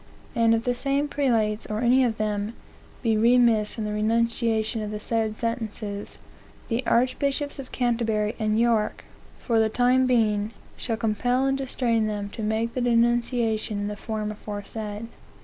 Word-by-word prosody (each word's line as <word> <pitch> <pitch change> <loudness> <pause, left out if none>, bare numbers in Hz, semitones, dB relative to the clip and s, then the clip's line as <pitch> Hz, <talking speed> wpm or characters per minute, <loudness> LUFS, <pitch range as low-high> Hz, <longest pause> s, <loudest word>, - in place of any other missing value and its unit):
And 230 -1 +4
if 225 - -1
the 245 - +1
same 275 +3 0
prelates, 230 -7 0
or 215 +1 -2
any 250 +2 +4
of 230 -3 0
them, 210 0 -1 0.5
be 225 -2 +2
remiss 230 -1 +4
in 220 - -2
the 210 - -2
denunciation 225 +1 +1
of 210 - -4
the 210 0 -4
said 220 0 -1
sentences, 215 -3 -4 0.5
the 235 +2 0
Archbishops 275 +4 +1
of 265 - -8
Canterbury 230 -3 0
and 215 0 +1
York, 230 -2 +1 0.3
for 230 -3 +1
the 220 0 +3
time 250 +3 +3
being, 220 -3 +2 0.2
shall 225 -3 -3
compel 245 +4 +1
and 270 0 +2
distrain 245 -4 0
them 205 -1 -3
to 220 - -7
make 220 +2 -1
the 255 - -2
denunciation 235 -2 +1
in 205 0 -2
the 210 - -4
form 215 0 -4
aforesaid." 210 +1 -6
225 Hz, 160 wpm, -25 LUFS, 215-245 Hz, 0.5 s, And